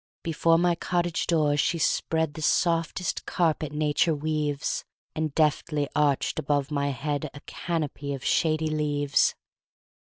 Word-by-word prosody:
Before 165 0 +3
my 175 +1 +3
cottage 175 0 -1
door 155 -4 +2
she 160 +3 +1
spreadThe 160 -1 0
softest 165 +2 0
carpet 160 -4 0
nature 150 +2 +1
weaves, 150 -1 -1 0.3
And 155 -2 -2
deftly 150 -1 +1
arched 145 -2 +1
above 145 0 0
my 140 -1 0
headA 145 +2 -2 0.2
canopy 150 -4 -3
of 135 - -9
shady 155 -1 +1
leaves. 145 -2 +1
155 Hz, 120 wpm, -26 LUFS, 145-165 Hz, 0.3 s, Before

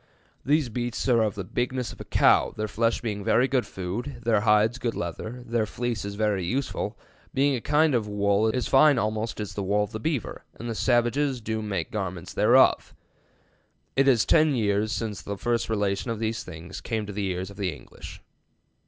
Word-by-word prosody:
These 145 -1 +2
Beasts 120 +2 -3
are 120 -2 +4
of 105 -2 0
the 100 - -4
bignesse 125 +3 -2
of - - -12
a - - -8
Cowe, - - +3
their 110 0 -1
flesh 115 +3 0
being 105 -3 -3
very 125 +6 +3
good 130 -4 +1
foode, 120 +8 -5
their 110 -3 +2
hides 110 +3 +3
good 120 -2 -2
lether, 110 +8 -5
their 115 -2 0
fleeces 110 -4 -3
very 105 -3 0
usefull, 130 +10 -2 0.4
being 140 +1 +3
a 120 - -4
kinde 150 +2 +3
of 115 -4 +1
wolle 100 +1 +2
as 125 +1 -2
fine 140 0 +5
almost 110 0 -2
as 105 -2 -4
the 100 - -3
wolle 100 +2 +1
of 105 - -6
the 110 - -5
Beaver, 145 -1 -3
and 120 - -7
the 115 - -2
Salvages 125 +4 +1
doe 110 0 -3
make 105 -2 -3
garments 95 -5 -4
thereof. - - +4 1.0
It 135 0 +3
is 125 -5 +4
tenne 155 -3 +4
yeares 105 -1 +1
since 110 -3 -3
first 115 +4 -2
the - - -5
relation 100 +2 -1
of 115 - -2
these 110 +1 -2
things 85 +2 -9
came 110 -3 -2
to 100 - -7
the 100 0 -2
eares 95 +1 -3
of 100 - -14
the 95 -3 -1
English.' 75 - -11
110 Hz, 195 wpm, -26 LUFS, 100-120 Hz, 1.0 s, fine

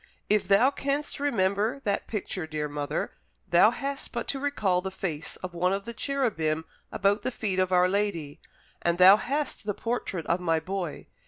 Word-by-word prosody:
If 210 -1 +3
thou 220 +7 +5
canst 285 +1 -2
remember 220 -2 +1
that 200 -2 -1
picture, 190 -5 -3
dear 155 -1 -2
mother, 145 0 -3 0.4
thou 175 +5 +6
hast 275 +3 -4
but 235 - -3
to 275 - -1
recall 215 -11 +1
the 190 - -3
face 175 -5 -4
of 185 -1 -5
one 180 +2 +1
of 195 +1 -3
the 235 - -5
cherubim 215 - -1 0.3
about 200 +1 +2
the - - -1
feet 210 -6 -2
of 185 0 +1
our 180 0 +5
Lady, 185 -7 -2 0.4
and 170 0 +1
thou 185 +3 +9
hast 280 +4 -2
the 205 -1 -2
portrait 220 -8 -3
of 170 - +1
my 165 -2 +1
boy. 180 -2 -4
195 Hz, 180 wpm, -27 LUFS, 175-235 Hz, 0.4 s, thou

